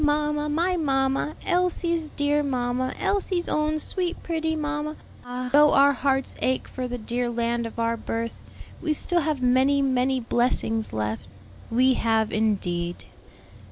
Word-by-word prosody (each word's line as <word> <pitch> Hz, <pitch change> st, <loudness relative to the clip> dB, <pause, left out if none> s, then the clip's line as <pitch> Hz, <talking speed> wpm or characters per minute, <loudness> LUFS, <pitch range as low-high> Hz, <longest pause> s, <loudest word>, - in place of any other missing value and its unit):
mamma, 295 Hz, 0 st, +1 dB
my 340 Hz, +5 st, +1 dB
mamma! 275 Hz, -2 st, 0 dB
Elsie's 345 Hz, -3 st, +1 dB
dear 290 Hz, +1 st, +2 dB
mamma! 255 Hz, -2 st, -1 dB
Elsie's 380 Hz, -3 st, 0 dB
own 305 Hz, 0 st, +1 dB
sweet 350 Hz, +3 st, -2 dB
pretty 320 Hz, -1 st, -1 dB
mamma.' 305 Hz, 0 st, -3 dB, 0.3 s
Ah, 250 Hz, +1 st, -5 dB
though 295 Hz, +1 st, +6 dB
our 280 Hz, +1 st, +6 dB
hearts 270 Hz, 0 st, 0 dB
ache 260 Hz, 0 st, 0 dB
for 255 Hz, -1 st, -4 dB
the 245 Hz, 0 st, -4 dB
dear 240 Hz, +2 st, -2 dB
land 235 Hz, 0 st, -1 dB
of 225 Hz, -, -11 dB
our 230 Hz, 0 st, +1 dB
birth, 230 Hz, +1 st, -4 dB, 0.4 s
we 315 Hz, -2 st, +1 dB
still 345 Hz, +3 st, +1 dB
have 300 Hz, -4 st, -1 dB
many 260 Hz, +3 st, +4 dB
many 260 Hz, -1 st, +1 dB
blessings 230 Hz, -2 st, 0 dB
left." 110 Hz, 0 st, -3 dB, 0.4 s
"We 255 Hz, +3 st, +4 dB
have 225 Hz, -2 st, +1 dB
indeed." 175 Hz, -5 st, -1 dB
270 Hz, 145 wpm, -25 LUFS, 240-305 Hz, 0.4 s, though